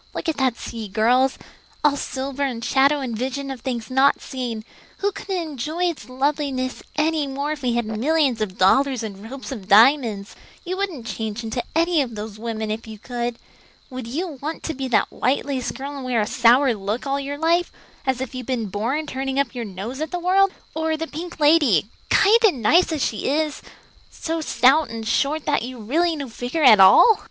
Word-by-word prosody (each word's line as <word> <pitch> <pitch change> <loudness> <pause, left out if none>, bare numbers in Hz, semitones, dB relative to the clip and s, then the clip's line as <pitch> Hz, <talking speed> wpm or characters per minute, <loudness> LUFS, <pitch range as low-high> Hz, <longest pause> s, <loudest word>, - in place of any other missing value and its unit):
Look - - -4
at 320 - -1
that 260 -3 +1
sea, 225 -2 -6
girls 245 +6 +2 0.5
all 295 -1 +4
silver 275 0 -4
and 245 -5 -2
shadow 280 +2 +3
and 245 -4 -3
vision 265 +4 -3
of 260 -3 -7
things 240 -2 -4
not 265 +2 +4
seen. 240 -5 -5 0.4
We 405 - +2
couldn't 390 -1 -4
enjoy 300 +6 -3
its 325 -10 -2
loveliness 265 -1 -1
any 305 -1 +1
more 280 +2 -3
if 305 -2 -4
we 250 -2 0
had 235 -1 0
millions 255 +3 +1
of 195 -3 -3
dollars 255 +6 +3
and 210 0 -7
ropes 275 +1 -8
of 210 -8 -7
diamonds. 220 -2 +4 0.3
You 365 +1 -3
wouldn't 370 -11 -4
change 225 -1 -4
into 225 +2 -2
any 335 -1 +3
of 240 -5 -4
those 210 0 -7
women 220 -1 -3
if 225 +1 -5
you 220 -1 -8
could. 240 +1 -4 0.5
Would 255 -2 -6
you 305 +3 -4
want 310 +3 -5
to 320 - -3
be 270 -2 -4
that 245 - +1
white 260 +3 0
lace 265 -3 -2
girl 280 +2 -7
and 275 - -6
wear 250 -3 0
a - - 0
sour 245 +4 +4
look 210 +4 -4
all 275 0 -1
your 280 +1 -4
life, 335 +3 +1 0.3
as 265 -2 0
if 260 - -5
you'd 255 -2 -6
been 235 -5 -2
born 235 +11 -2
turning 270 -1 -3
up 280 -4 0
your 240 -2 -4
nose 210 +8 -6
at 315 - -2
the 355 - -3
world? 375 +2 +3 0.2
Or 320 0 -1
the 325 - -3
pink 325 +2 -8
lady, 295 - +4 0.2
kind 425 +4 +5
and 295 - +3
nice 340 +10 +4
as 305 -4 0
she 215 - -2
is, 305 +1 -1 0.5
so 325 0 -4
stout 295 +1 +3
and 225 -1 -6
short 285 +6 0
that 290 -4 +1
you'd 240 -2 -7
really 335 +5 +2
no 285 -3 -5
figure 245 +7 -3
at 225 -7 +8
all? 195 - +7
265 Hz, 205 wpm, -22 LUFS, 230-300 Hz, 0.5 s, at